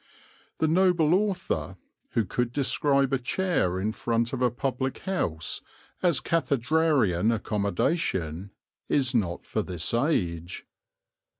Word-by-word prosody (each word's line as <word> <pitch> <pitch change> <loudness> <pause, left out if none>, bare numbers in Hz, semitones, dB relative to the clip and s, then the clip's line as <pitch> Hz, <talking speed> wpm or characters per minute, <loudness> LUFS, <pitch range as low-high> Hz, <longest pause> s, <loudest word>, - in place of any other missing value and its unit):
The 160 - +2
noble 170 -1 +3
author, 200 0 -1 0.4
who 115 - +2
could 120 +5 -1
describe 140 0 +1
a 135 - +2
chair 130 - 0
in 105 +3 0
front 115 +2 -1
of 130 - -3
a 125 - +4
public 130 +2 -2
house 85 - -2 0.4
as 170 -7 +3
"cathedrarian 140 - +2
accommodation," 100 - -1 0.4
is 135 -2 +2
not 95 -8 -1
for - - -1
this 90 0 -2
age. 90 - -1
125 Hz, 115 wpm, -27 LUFS, 100-155 Hz, 0.4 s, a